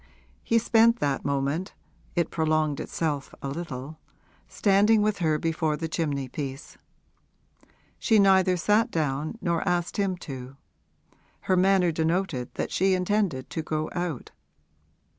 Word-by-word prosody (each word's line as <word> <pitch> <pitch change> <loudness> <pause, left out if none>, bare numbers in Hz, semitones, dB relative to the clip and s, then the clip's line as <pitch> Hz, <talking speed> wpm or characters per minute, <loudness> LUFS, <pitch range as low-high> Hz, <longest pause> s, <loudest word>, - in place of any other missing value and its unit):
He 230 - +2
spent 230 +1 +4
that 140 -7 -1
moment 140 +6 -2 0.4
it 170 -2 0
prolonged 155 -2 +1
itself 150 -4 -3
a 140 - -2
little 145 -1 -6 0.5
standing 205 +2 +3
with 210 -1 0
her 155 -3 +2
before 160 -1 -1
the 165 +1 -3
chimney 145 -5 -2
piece. 135 +1 -6 1.2
She 220 - +3
neither 190 -2 +4
sat 210 +7 +2
down 155 +2 -2
nor 170 -2 0
asked 175 -1 -1
him 195 -3 0
to; 135 -4 -8 0.8
her 185 - +1
manner 185 -1 +3
denoted 160 -5 -1
that - - -3
she 190 0 +2
intended 180 -7 -1
to 160 - -2
go 155 0 -3
out. 175 -7 -4
165 Hz, 130 wpm, -26 LUFS, 150-190 Hz, 1.2 s, spent